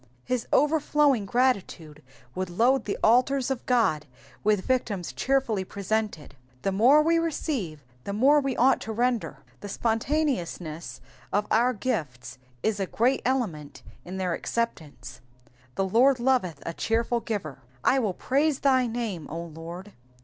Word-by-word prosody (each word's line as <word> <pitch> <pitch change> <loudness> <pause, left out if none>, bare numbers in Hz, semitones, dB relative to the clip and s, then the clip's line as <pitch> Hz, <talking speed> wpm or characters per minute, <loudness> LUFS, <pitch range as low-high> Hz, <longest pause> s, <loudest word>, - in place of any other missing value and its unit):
His 250 -2 -2
overflowing 295 -6 +3
gratitude 195 - -1 0.3
would 185 -1 -3
load 235 +8 +2
the 200 - -2
altars 255 +3 +3
of 260 - -3
God 210 -12 +2 0.4
with 210 -2 +2
victims 215 -8 -1
cheerfully 260 -7 0
presented. 200 -4 -3 0.3
The 195 - +1
more 250 +10 +5
we 330 +1 +3
receive, 260 - -3 0.2
the - - -4
more 270 +9 +4
we 270 -3 -2
ought 260 +3 +4
to 220 - -5
render. 240 0 -1 0.2
The 205 - -8
spontaneousness 190 - -2 0.3
of 205 +1 +1
our 240 +3 +3
gifts 130 - -4 0.2
is 220 -2 0
a 195 - -1
great 250 +7 +1
element 205 - -2 0.2
in 185 +2 -7
their 185 -2 -1
acceptance; 160 - -4 0.5
the 195 - 0
Lord 245 +7 +4
loveth 235 - 0
a 170 - -3
cheerful 230 +5 0
giver. 195 - -5
/ 125 -2 -31
toiU 230 -8 +2
praise 285 +2 +1
thy 260 -3 +3
name, 225 -9 -4
0 165 +1 -6
Lord. 170 +5 -9
225 Hz, 140 wpm, -26 LUFS, 180-260 Hz, 0.5 s, more